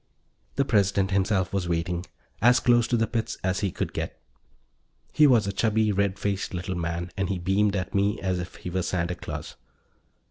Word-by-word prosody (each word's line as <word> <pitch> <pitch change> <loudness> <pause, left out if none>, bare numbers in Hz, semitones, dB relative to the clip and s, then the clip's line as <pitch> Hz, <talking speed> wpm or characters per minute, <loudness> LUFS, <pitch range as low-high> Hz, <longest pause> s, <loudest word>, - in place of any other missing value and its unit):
The 140 - +2
President 100 -4 +2
himself 95 0 +1
was 95 -3 -1
waiting, 85 +1 -1 0.3
as 120 +3 +6
close 120 -1 +4
to 120 - +1
the 115 - +2
pits 115 -1 -3
as 95 +1 0
he 100 -2 0
could - - -3
get. - - -4 0.9
He 150 -1 +6
was 120 -6 +4
a 100 - -2
chubby, 110 0 +2
red 100 -1 0
faced 100 -1 -2
little 95 +2 -3
man, 85 0 -3
and 95 -2 -1
he 95 - -1
beamed 95 +3 +1
at 95 -1 -3
me 100 +1 +1
as 95 -2 -1
if 90 +1 -6
he 90 - -7
were 95 +1 0
Santa 90 -1 -1
Claus. - - -7
100 Hz, 190 wpm, -26 LUFS, 90-105 Hz, 0.9 s, as